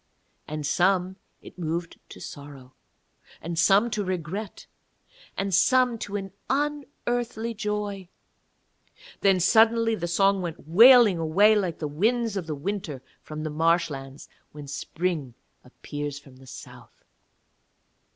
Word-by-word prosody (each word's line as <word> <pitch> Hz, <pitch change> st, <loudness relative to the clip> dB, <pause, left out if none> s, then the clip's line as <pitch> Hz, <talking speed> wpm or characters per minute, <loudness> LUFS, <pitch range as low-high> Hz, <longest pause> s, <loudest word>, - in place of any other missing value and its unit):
And 155 Hz, -1 st, -5 dB
some 185 Hz, +4 st, +1 dB, 0.3 s
it -, -, -13 dB
moved 165 Hz, 0 st, -4 dB
to -, -, -12 dB
sorrow 140 Hz, -3 st, -11 dB, 0.7 s
and 165 Hz, 0 st, -4 dB
some 200 Hz, +7 st, +4 dB
to 210 Hz, -1 st, -1 dB
regret, 185 Hz, +3 st, -5 dB, 0.7 s
and 195 Hz, 0 st, -2 dB
some 250 Hz, +4 st, +3 dB
to 205 Hz, -, -6 dB
an 195 Hz, -1 st, -4 dB, 0.2 s
unearthly 250 Hz, -5 st, -2 dB
joy, 205 Hz, -3 st, -4 dB, 1.1 s
then 195 Hz, -2 st, +3 dB
suddenly 225 Hz, +4 st, +4 dB
the 175 Hz, -5 st, -3 dB
song 195 Hz, +3 st, +2 dB
went 165 Hz, -4 st, -7 dB
wailing 225 Hz, +1 st, +7 dB
away 185 Hz, +7 st, +4 dB
like 185 Hz, -6 st, -1 dB
the 155 Hz, -, -4 dB
winds 220 Hz, +8 st, 0 dB
of 185 Hz, -4 st, -4 dB
the 155 Hz, -, -3 dB
winter 155 Hz, -4 st, -5 dB, 0.2 s
from 155 Hz, 0 st, -7 dB
the 155 Hz, -, -4 dB
marshlands 150 Hz, -4 st, -1 dB, 0.3 s
when 145 Hz, -1 st, -9 dB
Spring 145 Hz, -2 st, -3 dB, 0.3 s
appears 145 Hz, +2 st, -7 dB
from 135 Hz, -3 st, -15 dB
the 130 Hz, 0 st, -17 dB
South. -, -, -13 dB
185 Hz, 125 wpm, -25 LUFS, 155-210 Hz, 1.1 s, wailing